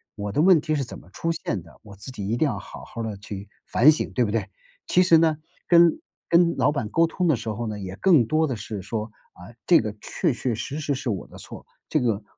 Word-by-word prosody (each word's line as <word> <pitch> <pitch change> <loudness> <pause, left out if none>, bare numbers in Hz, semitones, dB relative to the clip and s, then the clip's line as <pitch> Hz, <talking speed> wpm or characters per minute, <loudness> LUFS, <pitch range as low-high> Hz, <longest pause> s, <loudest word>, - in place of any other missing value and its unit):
我 105 -1 -4
的 130 - +1
问 175 -2 +6
题 155 - -2
是 140 -3 -1
怎 - - -9
么 - - -17
出 165 +10 -2
现 155 - -3
的， 85 - -18
我 100 -2 -12
自 105 +7 -7
己 105 -6 -6
一 115 +3 0
定 155 - +2
要 - - -2
好 - - -10
好 115 - -6
地 110 -3 -4
去 100 0 -8 0.2
反 145 +6 +6
省， 155 - -2
对 125 - +2
不 105 - -1
对？ 105 -3 -1 0.4
其 180 - +4
实 170 -2 +6
呢， 160 -2 +3 0.3
跟 170 - +5 0.3
跟 170 0 +4
老 135 +2 +3
板 120 -8 -2
沟 165 +8 +3
通 180 +2 -1
的 155 - +4
时 115 -1 -5
候 110 +2 -3
呢， 105 -1 -4
也 95 0 -7
更 165 -11 +4
多 155 +6 +1
地 130 - -2
是 105 -1 -6
说， 110 +3 -4 0.2
啊， 90 +5 -13 0.2
这 175 - +7
个 110 -1 -3
确 170 - -1
确 120 0 -2
实 140 +7 -5
实 145 -1 -1
是 130 -1 -4
我 100 -5 -3
的 - - -14
错， - - -10 0.2
这 155 - +2
个 115 -4 0
120 Hz, 275 characters per minute, -24 LUFS, 105-160 Hz, 0.4 s, 这